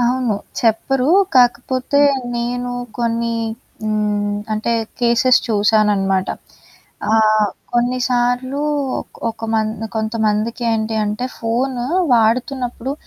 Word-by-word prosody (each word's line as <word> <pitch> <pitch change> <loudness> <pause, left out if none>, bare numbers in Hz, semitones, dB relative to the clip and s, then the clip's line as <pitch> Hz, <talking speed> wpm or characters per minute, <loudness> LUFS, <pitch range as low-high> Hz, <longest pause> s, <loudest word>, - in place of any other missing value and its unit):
అవును. 245 -2 +1 0.3
చెప్పరు. 250 +3 +1 0.3
కాకపోతే 255 +2 +2 0.4
నేను 245 +1 -2 0.3
కొన్ని 230 0 0 0.5
హ్మ్, 210 -1 0 0.2
అంటే 215 +2 -1 0.3
కేసెస్ 240 +1 +4
చూసాననమాట. 205 -3 +2 0.8
ఆహ్, 215 -1 +4 0.2
కొన్నిసార్లు 245 +2 0 0.7
ఒక 225 - -9
మం 220 -1 +2 0.3
కొంతమందికేంటి 220 +1 -1
అంటే 210 +5 -2
ఫోను 240 +2 -1 0.3
వాడుతున్నప్పుడు 245 +2 0
235 Hz, 80 wpm, -18 LUFS, 215-245 Hz, 0.8 s, కేసెస్